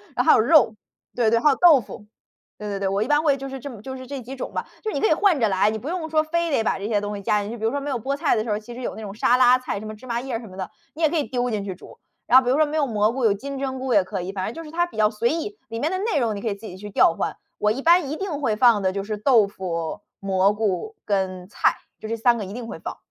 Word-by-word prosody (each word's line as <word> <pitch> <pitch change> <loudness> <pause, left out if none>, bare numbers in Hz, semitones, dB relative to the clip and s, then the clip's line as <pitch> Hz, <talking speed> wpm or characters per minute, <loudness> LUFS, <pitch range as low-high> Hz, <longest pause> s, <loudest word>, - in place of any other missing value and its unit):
然 - - +2
后 - - +7
还 - - +7
有 - - +3
肉， 240 -2 +5 0.4
对 235 -3 +3
对， 230 - +4
还 300 - +4
有 275 - +3
豆 330 -4 +7
腐。 210 0 -11 0.5
对 210 - -6
对 200 - -3
对， 195 - -1
我 200 +1 0
一 220 - 0
般 295 +2 +3
会 285 -3 +3
就 275 - -6
是 270 0 -6
这 285 - -6
么 220 -4 -11
就 265 +2 -7
是 260 - -9
这 275 +1 -6
几 255 +3 -8
种 260 - -6
吧。 - - -3 0.2
就 435 - -2
是 - - -5
你 - - 0
可 435 - +4
以 - - +4
换 345 -3 +3
着 225 - +3
来， 200 +1 +2
你 220 - -4
不 265 - -8
用 345 -2 -3
说 310 0 +3
非 335 +1 -1
得 270 - +2
把 215 - 0
这 195 - -6
些 215 -2 +1
东 205 0 -4
西 - - -7
加 210 +1 +2
进 205 - -5
去， 235 - -6
比 220 - -9
如 225 - +2
说 285 - -1
没 290 - -4
有 265 - -1
菠 265 +5 -2
菜 295 +1 +1
的 215 - 0
时 225 - -6
候， 210 - 0
其 240 +2 -11
实 255 - -7
有 - - -3
那 220 - -8
种 205 -1 -7
沙 245 +3 +3
拉 255 0 +6
菜， 255 -5 -4
什 215 - -9
么 215 - -7
芝 235 - -15
麻 235 -2 -2
叶 255 -3 -3
什 230 - -10
么 185 - -12
的， 190 -2 -4 0.3
你 330 - -8
也 315 - +4
可 340 - -3
以 295 - +1
丢 250 -2 -2
进 210 -3 -2
去 190 - -4
煮。 180 - -15 0.3
然 250 - +7
后 - - -3
比 - - +1
如 - - +3
说 310 - +4
没 295 - -5
有 295 - +2
蘑 215 -1 +2
菇， 260 -1 -3
有 210 - +5
金 275 +7 -6
针 265 -1 -3
菇 260 -1 -1
也 205 - +6
可 195 0 -4
以， 180 +2 -5
反 190 -2 -3
正 220 - -4
就 330 - -7
是 - - -10
它 345 +2 +1
比 350 - -14
较 215 -1 +4
随 230 +2 0
意， 335 +6 -3
里 230 - -5
面 300 - 0
的 375 - -1
内 420 -6 0
容， 230 -4 0
你 200 - -6
可 230 - -4
以 200 - -2
自 210 +3 -13
己 180 - -8
去 205 +2 -8
调 195 - +4
换， - - -3 0.2
我 210 - +1
一 260 +5 -3
般 335 -3 +4
一 305 - -2
定 350 -6 -3
会 225 -6 +1
放 235 -4 +5
的 185 - +1
就 195 - -2
是 210 +1 -4
豆 225 -1 +4
腐、 170 -5 -4 0.2
蘑 195 0 +2
菇 220 - -2
跟 185 -2 -2
菜， - - +2 0.2
就 220 - -7
这 230 - -2
3 235 +1 +3
个 205 - -4
一 195 - -8
定 235 0 -6
会 - - -7
放。 - - -6
235 Hz, 375 characters per minute, -23 LUFS, 205-280 Hz, 0.5 s, 后